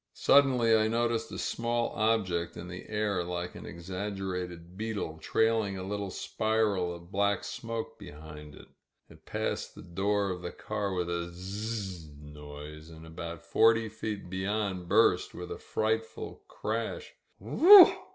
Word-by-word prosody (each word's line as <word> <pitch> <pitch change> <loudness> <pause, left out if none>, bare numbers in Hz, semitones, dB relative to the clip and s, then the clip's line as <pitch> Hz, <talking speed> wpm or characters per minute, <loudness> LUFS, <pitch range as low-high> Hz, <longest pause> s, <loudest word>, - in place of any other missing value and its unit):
Suddenly 130 -5 +5
I 110 0 +3
noticed 115 0 0
a - - -5
small 115 0 -1
ob* 110 -1 +2
ject 85 -2 -3
in 85 - -7
the 90 +1 -9
air 105 -4 0
like 90 0 -4
an - - -9
exaggerated 90 -1 -5
beetle, 105 -7 -4
trailing 110 +1 +1
a 95 - -5
little 100 +1 -3
spiral 105 -3 0
of 85 +1 -14
black 100 0 +1
smoke 115 -1 -5
behind 75 -5 -10
it. - - -14 0.4
It - - -18
passed - - -3
the - - -10
door 100 +3 0
of 90 -1 -5
the 90 - -5
car 105 -3 -3
with 90 -1 -1
a 85 0 -2
zzzzzing 90 -6 -6
noise 75 +1 -10
and 80 0 -12
about 85 0 -7
forty 115 0 +4
feet 105 -3 -5
beyond 95 -1 -2
burst 100 -4 +3
with 90 0 -7
a - - -5
frightful 110 +1 -2
Crash 110 +1 -4
— - - -42
^Whee - - -6
e - - +4
e 395 -1 +13
eeaa - - -12
95 Hz, 160 wpm, -30 LUFS, 85-110 Hz, 0.4 s, e